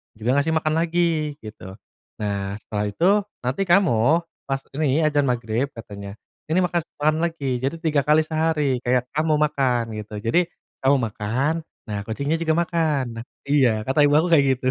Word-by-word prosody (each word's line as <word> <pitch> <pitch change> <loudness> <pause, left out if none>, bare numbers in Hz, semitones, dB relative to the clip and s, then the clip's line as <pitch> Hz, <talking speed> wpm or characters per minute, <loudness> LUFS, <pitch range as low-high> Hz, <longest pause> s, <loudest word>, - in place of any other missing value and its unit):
juga 110 +2 -3
ngasih 160 +3 0
makan 155 -1 +1
lagi 165 -2 0
gitu. 95 -3 -9 0.4
Nah, 100 -2 -2
setelah 105 -1 -3
itu 170 - +2 0.3
nanti 130 +10 -1
kamu 175 -6 +4 0.5
pas 135 0 -1 0.2
ini 145 -1 +1
azan 145 -1 +2
magrib 120 +1 -1
katanya 100 -4 -9 0.4
ini 175 - +3
makan 175 -2 0 0.2
makan 155 +1 +2
lagi. 140 -7 -2
Jadi 140 +5 0
3 155 -4 +1
kali 150 +1 +5
sehari, 155 -5 0
kayak 125 0 +1
kamu 155 +1 +2
makan 135 -5 +1 0.2
gitu. 105 0 -7
Jadi 165 +12 +1 0.4
kamu 135 +2 +5
makan, 115 +8 -1 0.3
nah 105 -2 -3
kucingnya 140 +8 -1
juga 160 -1 +1
makan. 160 -5 +1 0.2
Nah - - -6 0.2
iya 140 -3 +4 0.2
kata 135 +3 +3
ibu 145 0 +4
aku 175 - +1
kayak 145 -4 +5
gitu. 130 - -3
140 Hz, 165 wpm, -23 LUFS, 120-160 Hz, 0.5 s, kali